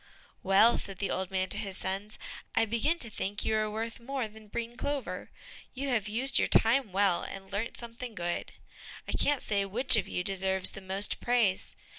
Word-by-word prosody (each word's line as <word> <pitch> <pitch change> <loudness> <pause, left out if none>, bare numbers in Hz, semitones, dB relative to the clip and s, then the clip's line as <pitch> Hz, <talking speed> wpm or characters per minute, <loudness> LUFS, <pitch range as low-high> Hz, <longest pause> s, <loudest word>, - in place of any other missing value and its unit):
"Well," 200 +5 +5
said 195 -1 -3
the 195 - -2
old 190 -1 -2
man 190 -1 -1
to - - +1
his 195 -2 -4
sons, 195 +3 -4 0.4
"I - - +4
begin 235 +10 +1
to 235 -8 -5
think 205 0 -3
you 220 - +1
are 215 0 +1
worth 225 +3 -4
more 260 0 -3
than 215 0 -15
breen 235 +3 -4
clover; 285 +1 -3 0.5
you 275 +2 -3
have 220 -5 +1
used 245 +5 +2
your - - +2
time 225 -1 +4
well, 195 -2 +2
and 195 0 -8
learnt 205 +4 -3
something 235 0 -7
good. 175 -2 -3 0.6
I - - -3
can't 290 -2 +1
say 200 -2 +1
which 245 +6 +4
of 205 -3 +1
you 180 - -2
deserves 190 0 +1
the 195 - -9
most 190 +2 +1
praise. 235 -6 +1
215 Hz, 195 wpm, -30 LUFS, 195-235 Hz, 0.6 s, Well